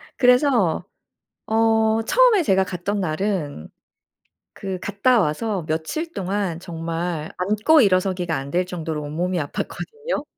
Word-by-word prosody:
그래서 250 Hz, -, +3 dB, 0.6 s
어 220 Hz, 0 st, +2 dB
처음에 475 Hz, -, +4 dB
제가 190 Hz, -8 st, +3 dB
갔던 190 Hz, +3 st, -3 dB
날은 155 Hz, -, -2 dB, 0.9 s
그 190 Hz, -2 st, -5 dB
갔다 205 Hz, +6 st, +2 dB
와서 185 Hz, +2 st, -1 dB
며칠 165 Hz, -, -3 dB
동안 190 Hz, -3 st, -2 dB
정말 165 Hz, -2 st, -4 dB
앉고 215 Hz, +11 st, +3 dB
일어서기가 185 Hz, -4 st, +1 dB
안될 140 Hz, +7 st, -1 dB
정도로 165 Hz, -4 st, -4 dB
온몸이 175 Hz, +5 st, -2 dB
아팠거든요? 450 Hz, -, -4 dB
185 Hz, 255 characters per minute, -22 LUFS, 165-220 Hz, 0.9 s, 처음에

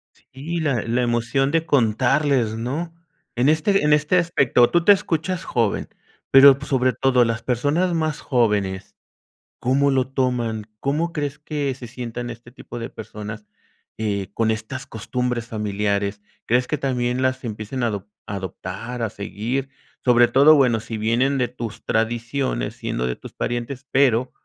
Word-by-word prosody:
Sí, 155 Hz, +6 st, -6 dB
la 140 Hz, -8 st, 0 dB
la 120 Hz, +2 st, 0 dB
emoción 120 Hz, +3 st, +1 dB
de 165 Hz, 0 st, +1 dB
contarles, 130 Hz, -1 st, +2 dB
¿no? 145 Hz, +9 st, -3 dB, 0.4 s
En 125 Hz, +4 st, +3 dB
este, 160 Hz, +5 st, +2 dB
en 150 Hz, 0 st, +4 dB
este 150 Hz, +4 st, +3 dB
aspecto, 140 Hz, -8 st, +3 dB
tú 175 Hz, 0 st, +3 dB
te 205 Hz, -, +7 dB
escuchas 185 Hz, -1 st, 0 dB
joven, 115 Hz, -, -1 dB, 0.4 s
pero, 135 Hz, 0 st, +9 dB
pues, 140 Hz, -, -9 dB
sobre 130 Hz, -2 st, +2 dB
todo 125 Hz, +1 st, +3 dB
las 115 Hz, 0 st, -2 dB
personas 145 Hz, +9 st, +1 dB
más 155 Hz, -2 st, -1 dB
jóvenes, 105 Hz, -7 st, 0 dB, 0.6 s
¿cómo 140 Hz, +3 st, +2 dB
lo 130 Hz, -1 st, +1 dB
toman? 125 Hz, -5 st, -1 dB
¿Cómo 155 Hz, +7 st, -1 dB
crees 145 Hz, -2 st, -3 dB
que 145 Hz, -2 st, -3 dB
se 125 Hz, -, -9 dB
sientan 120 Hz, 0 st, -6 dB
este 120 Hz, +1 st, -12 dB
tipo 120 Hz, -1 st, -9 dB
de 115 Hz, +2 st, -5 dB
personas, 105 Hz, -1 st, -8 dB, 0.5 s
eh, 100 Hz, -3 st, -2 dB
con 115 Hz, 0 st, +1 dB
estas 110 Hz, +4 st, -4 dB
costumbres 125 Hz, +1 st, -3 dB
familiares? 100 Hz, -2 st, -2 dB, 0.3 s
¿Crees 125 Hz, +2 st, +2 dB
que 150 Hz, -, -2 dB
también 125 Hz, -2 st, -1 dB
las 130 Hz, 0 st, 0 dB
empiecen 110 Hz, +2 st, -4 dB
a -, -, +3 dB
adop 100 Hz, -2 st, -4 dB, 0.2 s
adoptar 100 Hz, +5 st, -6 dB
a 110 Hz, -, 0 dB
seguir? 120 Hz, +7 st, -3 dB, 0.3 s
Sobre 120 Hz, -1 st, +5 dB
todo, 140 Hz, +5 st, +6 dB
bueno, 125 Hz, -6 st, +3 dB
si 115 Hz, 0 st, -6 dB
vienen 120 Hz, +6 st, +1 dB
de 125 Hz, -2 st, +1 dB
tus 115 Hz, -2 st, -7 dB
tradiciones, 115 Hz, -, -1 dB
siendo 60 Hz, -, -3 dB
de 60 Hz, 0 st, -2 dB
tus -, -, -12 dB
parientes, 120 Hz, +3 st, -4 dB
pero, 130 Hz, -2 st, +3 dB
125 Hz, 155 wpm, -22 LUFS, 115-140 Hz, 0.6 s, pero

